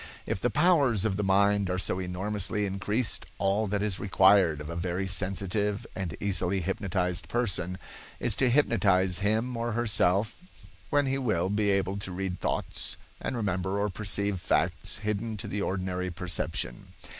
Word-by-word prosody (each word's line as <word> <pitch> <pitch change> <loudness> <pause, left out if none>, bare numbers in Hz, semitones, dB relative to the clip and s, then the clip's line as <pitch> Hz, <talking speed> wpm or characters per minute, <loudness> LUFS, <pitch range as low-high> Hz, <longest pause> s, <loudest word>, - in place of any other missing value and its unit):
If 95 - -2
the 125 - +2
powers 140 - +3
of 100 -3 +1
the 105 - -1
mind 100 0 +3
are 90 - 0
so 95 0 -1
enormously 95 +2 -2
increased, 100 +4 -2
all 100 +2 +1
that 100 +1 -1
is 100 -3 -1
required 95 -5 +4
of 75 - -6
a 85 - -5
very 90 +2 -2
sensitive 100 +3 -1
and 95 -5 -4
easily 95 -1 0
hypnotized 90 -2 -1
person 95 -6 -1 0.4
is - - +1
to 130 - +3
hypnotize 100 -9 +3
him 110 +5 0
or 115 0 -2
herself, 105 - +2 0.5
when 145 -1 +3
he 135 0 0
will 95 -8 0
be 105 0 +1
able 95 0 +1
to 100 -2 -6
read 90 0 -3
thoughts - - -2 0.2
and - - -3
remember 95 -2 -1
or 105 +1 0
perceive 100 0 0
facts 90 - 0
hidden 105 +1 -2
to 105 +1 -5
the 100 0 -2
ordinary 90 -1 -2
perception. 85 -8 -2
100 Hz, 160 wpm, -28 LUFS, 90-105 Hz, 0.5 s, required